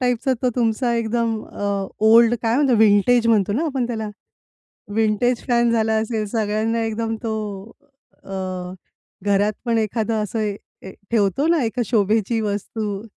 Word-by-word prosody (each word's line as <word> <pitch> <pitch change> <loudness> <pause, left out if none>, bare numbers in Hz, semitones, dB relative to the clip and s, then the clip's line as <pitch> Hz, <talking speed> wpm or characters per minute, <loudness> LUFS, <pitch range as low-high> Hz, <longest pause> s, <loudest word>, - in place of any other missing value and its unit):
टाइपचा 250 +1 +1
तो 255 - +3
तुमचा 235 +1 +1
एकदम 230 -1 -1
अ, 200 -1 -3 0.2
ओल्ड 230 +1 +6
काय 225 0 +1
म्हणतो, 275 -4 +3
विंटेज 220 +3 +4
म्हणतो 205 -3 +3
ना 285 +10 0
आपण 270 -5 -1
त्याला? 220 -3 -4 0.9
विंटेज 225 +3 +1
फॅन 240 -1 +3
झाला 220 -1 +1
असेल, 220 0 -1
सगळ्यांना 220 +1 -1
एकदम 225 0 -2
तो 225 -2 -2 0.9
अ, - - -12 0.9
घरात 205 +1 +2
पण 230 -2 +1
एखादं 220 0 -1
असं 210 +2 -4
ए 200 -2 -6 0.2
ठेवतो 230 +6 +1
ना, 330 -3 +3
एक 230 +2 -2
शोभेची 220 +1 +1
वस्तू. 205 0 -3
225 Hz, 140 wpm, -21 LUFS, 210-235 Hz, 0.9 s, ओल्ड